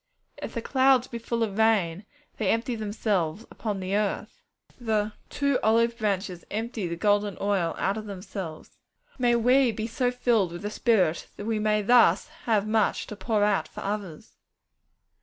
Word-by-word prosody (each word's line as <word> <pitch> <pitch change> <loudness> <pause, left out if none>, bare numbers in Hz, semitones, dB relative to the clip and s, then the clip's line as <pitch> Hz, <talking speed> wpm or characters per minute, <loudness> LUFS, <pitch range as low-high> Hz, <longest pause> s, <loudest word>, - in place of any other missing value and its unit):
'If - - -6
the 230 - -3
clouds 260 -1 +4
be 235 - -7
full 230 0 -1
of 210 -1 -3
rain, 205 -4 +2 0.3
they 210 -4 0
empty 230 +2 0
themselves 205 -4 -1
upon 210 -3 -4
the 190 +1 -2
earth.' 210 -1 -2 0.4
The 215 -3 0 0.2
'two 280 -2 +1
olive 230 +1 +3
branches 190 -4 -2
empty 220 -2 -3
the 170 - -3
golden 205 +1 +1
oil 195 -5 0
out 195 +2 0
of 215 -1 -6
themselves.' 190 -4 -7 0.4
May 240 -1 +3
we 250 +2 +4
be 220 0 -4
so 245 +2 0
filled 235 -7 +1
with 175 - -7
the 205 - -3
Spirit 190 -9 +1
that 205 - -7
we 220 -1 0
may 210 0 +1
thus 215 -5 +4 0.2
have 215 -3 +2
much 220 -1 +1
to 210 - -8
pour 210 0 0
out 205 -1 +2
for - - -9
others! 200 -6 -5
215 Hz, 170 wpm, -26 LUFS, 195-230 Hz, 0.4 s, clouds